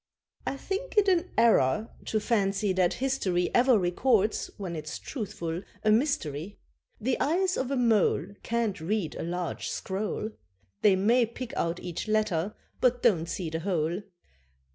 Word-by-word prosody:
I 275 - -1
think 400 - -4
it 415 -1 +5
an 365 -1 +3
error, 220 - +4
to 215 - 0
fancy 205 -2 +1
that 180 -2 +2
history 200 -10 0
Ever 250 -1 +5
records 210 +4 +1
(when 185 -4 -4
it's 155 +1 -5
truthful) 175 - -4 0.2
a 215 - +4
mystery. 205 - 0 0.4
The 250 +3 0
eyes 360 +6 +2
of 260 - -2
a 275 - 0
mole 210 - +2
Can't 230 -4 -1
read 185 -1 -1
a - - -6
large 175 +1 -3
scroll; 210 +2 -3 0.5
They 200 -2 +6
may 230 +5 +3
pick 235 +1 -7
out 170 +1 -1
each 175 +3 -5
letter, 215 -4 0 0.2
but 245 -1 +2
don't 170 -5 +3
see 165 -1 -4
the 160 - -2
whole. 170 0 -1
210 Hz, 150 wpm, -28 LUFS, 175-245 Hz, 0.5 s, They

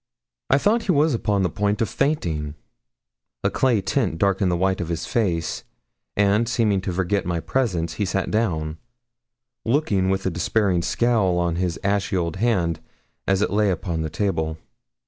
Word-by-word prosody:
I 135 - +5
thought 215 +10 +2
he 195 - +2
was 150 -1 +3
upon 105 -4 +1
the 90 - +1
point 105 +3 0
of 115 - +1
fainting 80 - -1 0.9
a - - +2
clay 125 -6 +2
tint 100 -3 0
darkened 100 0 +2
the 85 - +1
white 95 +1 +1
of 85 - -3
his 85 -1 -2
face; 90 -8 -1 0.5
and, 105 +3 +3
seeming 110 -6 +1
to 95 - -3
forget 95 +2 0
my 85 -1 -1
presence, 90 -7 -1
he - - +2
sat 95 0 -1
down, 80 -8 -1 0.8
looking 110 -8 +1
with 95 0 -1
a 95 - +1
despairing 90 +2 +1
scowl 105 -3 +1
on 85 -1 0
his 90 -2 -1
ashy 100 -1 0
old 85 -1 -2
hand, 95 -7 +1 0.5
as 95 +1 +2
it - - -1
lay 105 0 +2
upon 85 -2 -2
the 80 - -2
table. 80 -2 -1
95 Hz, 170 wpm, -23 LUFS, 85-110 Hz, 0.9 s, I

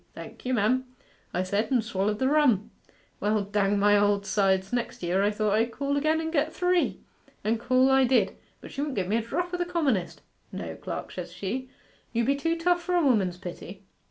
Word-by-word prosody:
"Thank - - -9
you, 255 - +1
mem," 245 +4 +2 0.5
I 180 - -1
said, 200 +4 -1
and 250 -4 +2
swallered 210 -1 -1
the 260 - +1
rum. 270 -9 +3 0.5
Well, 210 0 +1
dang 205 0 +1
my 205 +1 +4
old 205 -1 +2
sides, 190 0 +1
next 240 -4 -3
year 180 +3 +1
I 205 - +3
thought 210 -1 0
I'd 225 +2 +2
call 280 +3 -2
again 310 +2 +2
and 320 0 -3
get 310 0 +1
three. 360 0 +1 0.4
And 220 +2 +1
call 255 +2 +3
I 265 0 +5
did. 255 0 +2 0.3
But - - -10
she 280 - -4
wouldn't 290 -2 -2
give 190 -3 -1
me 215 +4 +1
a - - +1
drop 350 +10 -3
o' - - 0
the 350 - 0
commonest. 300 - -1 0.3
"No, - - -6
clerk," - - -6
says - - -6
she, 255 +7 -4 0.4
"you 235 0 +1
be 275 +3 +2
too 330 +4 -1
tough 350 +1 +2
for 360 +1 -1
a 350 - +3
woman's 195 -9 +2
pity."... 185 +2 -9
235 Hz, 215 wpm, -27 LUFS, 200-285 Hz, 0.5 s, I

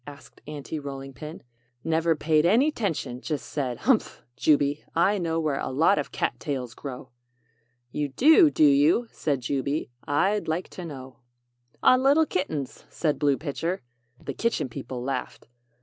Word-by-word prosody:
asked 145 -1 -13
Aunty 150 +1 -5
Rolling 135 -1 -7
Pin. 150 +5 -9 0.4
"Never 165 0 +2
paid 155 0 +2
any 235 - +4
'tention 150 - -3
just 150 -2 -3
said: 130 -5 -3
'Humph, 255 -4 +1
Jubey, 145 0 +2
I 195 +5 +3
know 165 -2 -1
where 150 -4 -1
a - - -3
lot 150 +3 +3
of 145 - -4
cat 120 - -2
tails 130 -5 -4
grow!' 130 -1 -8 0.8
"'You 150 -1 -2
do, 310 - +6
do 310 - +2
you?' 285 -3 +4
said 140 -4 -1
Jubey. 140 +3 -2 0.2
'I'd 195 +9 +1
like 160 +3 -2
to 180 - -8
know.' 130 -4 -9 0.6
"'On 255 0 +6
little 285 +4 +5
kittens!' 155 - -3
said 155 -3 -1
Blue 145 -2 +2
Pitcher." 165 +3 -3 0.4
The - - -6
Kitchen 230 - -1
People 120 +1 -6
laughed. 130 -1 -4
150 Hz, 155 wpm, -26 LUFS, 135-185 Hz, 0.8 s, do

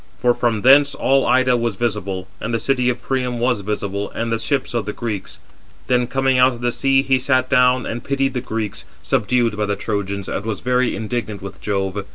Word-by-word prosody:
For 125 -1 +3
from 115 -4 -1
thence 140 +2 +6
all 135 0 +2
Ida 130 -1 +4
was 115 -3 -1
visible, 100 -4 -2
and 110 - -4
the - - 0
city 125 -1 +1
of 125 0 -3
Priam 125 -2 -1
was 120 -3 +1
visible, 100 0 -3
and 115 0 -3
the 115 - 0
ships 130 +3 -1
of 115 -3 -2
the 105 - -3
Greeks. 110 -5 -5 0.5
Then 125 -1 +1
coming 135 0 +1
out 130 +1 +5
of 120 - -10
the 120 0 +1
sea, 135 +1 +2
he 130 -1 +2
sat 130 -1 +1
down, 125 -1 +4
and 120 +1 -4
he - - -19
pitied 135 -1 0
the 125 - -2
Greeks, 110 -4 -4 0.2
subdued 120 0 +1
by 105 0 -1
the 100 - 0
Trojans, 100 -1 -3
and - - -3
was 110 -3 -4
very 125 0 +1
indignant 110 -2 -4
with 100 -1 -9
Jove. 100 -1 -2
120 Hz, 215 wpm, -20 LUFS, 105-130 Hz, 0.5 s, thence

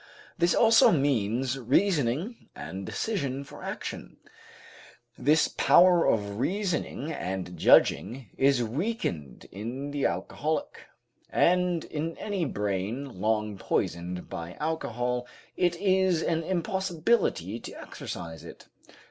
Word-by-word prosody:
This 170 0 +2
also 225 -1 +6
means 130 -3 +1
reasoning 150 - 0
and 95 0 -7
decision 140 - -2
for - - -12
action. - - -6 1.0
This 150 +5 +3
power 180 -1 +5
of 100 -1 0
reasoning 165 -1 -1
and 95 - -4
judging 115 +7 +3
is 135 -2 +3
weakened 115 - -3
in 125 +8 -5
the 145 -1 +1
alcoholic, 145 - -3 0.4
and 180 -1 +2
in 160 +2 -4
any 200 -5 -2
brain 105 +2 -3
long 105 -2 0
poisoned 90 0 -2
by 85 +1 -6
alcohol 125 -6 -2 0.3
it 175 -1 +2
is 185 -2 +2
an 165 -1 0
impossibility 175 - 0
to - - -9
exercise 80 -2 -7
it. - - -12
140 Hz, 105 wpm, -28 LUFS, 105-175 Hz, 1.0 s, also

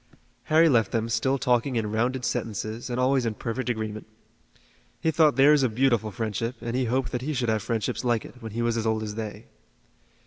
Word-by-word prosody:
Harry 160 +2 +5
left 115 -8 +3
them 115 -1 0
still 115 +4 +1
talking 125 0 +1
in 110 -2 -1
rounded 120 +3 0
sentences 115 -1 -3
and 125 0 -2
always 130 0 +2
in 115 -2 -2
perfect 125 +4 -3
agreement. 110 -2 -4 0.9
He 160 - +1
thought 155 -3 +4
theirs 145 +2 +6
a 130 - +2
beautiful 120 -2 +1
friendship, 110 +3 -3
and 115 0 -4
he 130 0 +1
hoped 125 +1 -1
that 125 - -2
he 150 +3 -3
should 125 -3 0
have 110 -1 +1
friendships 115 +2 -2
like 120 -3 +1
it, 125 - -13
when 110 -2 -7
he 120 +1 -1
was 115 0 0
as 115 0 -1
old 110 0 0
as 105 -1 -4
they. 110 0 -6
120 Hz, 210 wpm, -26 LUFS, 110-130 Hz, 0.9 s, theirs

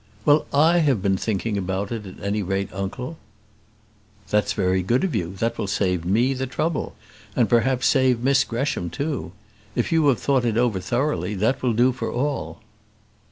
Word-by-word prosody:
"Well, 150 0 +4
I 160 +5 +4
have 135 - +2
been 100 -1 +2
thinking 105 +1 -1
about 95 +2 -3
it, 110 -4 -4
at 95 - -11
any 100 +1 -1
rate, 95 +1 -2
uncle." 125 +10 -5 1.1
"That's 105 -1 +2
very 95 0 +1
good 120 +8 +1
of 185 -6 0
you; 95 -3 -2
that 115 +4 -2
will 105 - -1
save 90 -3 0
me 115 +9 +2
the 130 0 -3
trouble; 155 +4 -2 0.4
and - - +3
perhaps 125 +1 +2
save 130 -3 +3
Miss 135 +1 +3
Gresham 115 -7 -2
too. 140 - -3 0.4
If - - -1
you 160 -2 +3
have 135 -4 +4
thought 135 -3 +1
it 115 -2 0
over 120 -5 +2
thoroughly, 120 0 -1
that 110 +7 0
will 125 -2 +1
do 120 +3 +4
for 125 - -4
all." 140 +3 -3
120 Hz, 180 wpm, -23 LUFS, 100-135 Hz, 1.1 s, Well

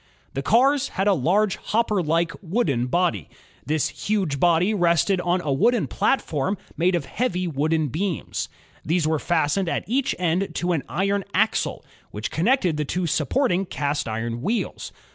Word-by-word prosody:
The 135 - -2
cars 270 - +3
had 195 - +1
a 205 - +5
large 195 +7 +2
hopper 215 -3 0
like, 165 +1 +1
wooden 160 - 0
body. 125 - 0 0.4
This 155 -1 +1
huge 190 -10 -1
body 175 +5 +3
rested 175 0 +2
on 180 +1 +1
a 145 -5 -1
wooden 240 - +2
platform 190 - 0 0.2
made 175 +2 +2
of 165 -5 -2
heavy 185 - -1
wooden 155 0 0
beams. 175 +5 -3 0.3
These 165 0 +1
were 160 -1 +1
fastened 170 +3 +1
at - - -1
each 255 +4 0
end 180 +2 0
to 175 +1 0
an 165 -5 +1
iron 195 +3 0
axle, 220 +3 +1 0.2
which 105 +2 -5
connected 180 - +2
the 150 - 0
two 175 +5 -2
supporting 180 - +1
cast 145 -1 -2
iron 115 +1 -3
wheels. 225 - -2
175 Hz, 160 wpm, -23 LUFS, 150-200 Hz, 0.4 s, a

